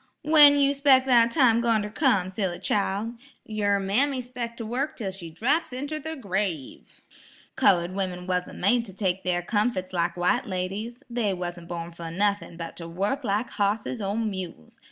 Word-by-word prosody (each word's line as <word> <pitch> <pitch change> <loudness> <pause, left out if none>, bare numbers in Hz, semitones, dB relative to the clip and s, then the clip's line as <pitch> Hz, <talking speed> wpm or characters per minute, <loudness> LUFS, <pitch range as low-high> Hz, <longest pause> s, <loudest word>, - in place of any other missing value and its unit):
"When 295 -2 +7
you 280 0 +3
'spec' 275 -2 +4
that 235 -3 +5
time 235 -4 +4
goin' 230 -3 +2
ter 210 - -6
come, 215 - +1
silly 190 -3 -2
chile? 205 +2 -1 0.3
yer 205 -2 0
mammy 255 +8 +1
'spec' 245 -2 -6
to 230 - -5
wurk 255 +7 -2
'tell 200 -5 -3
she 180 -3 -8
draps 265 - 0
inter 285 +5 -4
the 320 +2 -6
grave. 190 - -4 0.5
Colored 175 0 +3
women 185 -2 -3
wasn't 180 -1 -2
made 230 +5 +2
to 195 - -10
take 190 -2 -1
their 175 -1 0
comfit 205 -2 -1
lak 175 0 -1
white 175 +1 +1
ladies. 200 +6 -4
They 230 -5 -1
wasn't 175 -1 -6
born 170 -1 -5
fer 170 -1 -8
nuthin' 200 0 -1
but 165 -1 -7
ter 165 - -7
wurk 200 +11 -2
lak 215 +2 -1
hosses 210 +3 -1
or 200 +2 -2
mules. 190 - -5
205 Hz, 175 wpm, -26 LUFS, 180-245 Hz, 0.5 s, When